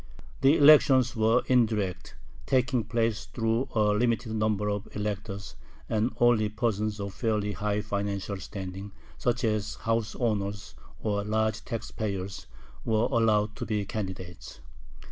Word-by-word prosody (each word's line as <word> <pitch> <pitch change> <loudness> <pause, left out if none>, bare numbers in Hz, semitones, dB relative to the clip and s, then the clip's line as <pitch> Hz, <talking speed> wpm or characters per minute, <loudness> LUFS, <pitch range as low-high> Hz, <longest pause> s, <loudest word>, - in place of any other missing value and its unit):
The 135 +4 +5
elections 135 -4 +6
were 110 +2 +3
indirect, 110 -7 +1 0.3
taking 125 -2 +2
place 115 -2 0
through 115 +2 -1
a 105 -2 +3
limited 115 +1 0
number 105 -1 0
of 100 -1 -2
electors, 105 -1 -4 0.3
and 110 +2 +1
only 120 -3 +4
persons 105 -1 -1
of 100 -1 -4
fairly 105 -2 -1
high 105 +1 -1
financial 100 -1 -3
standing, 95 +1 -7 0.3
such 120 0 0
as 105 -2 0
house 115 -1 -1
owners 100 -5 -2 0.3
or 100 -2 0
large 110 +1 0
tax 115 -3 -5
payers, 100 -3 -4 0.4
were 110 0 +1
allowed 110 -3 +2
to - - -4
be 105 -2 -1
candidates. 95 -4 -6
105 Hz, 130 wpm, -28 LUFS, 100-115 Hz, 0.4 s, elections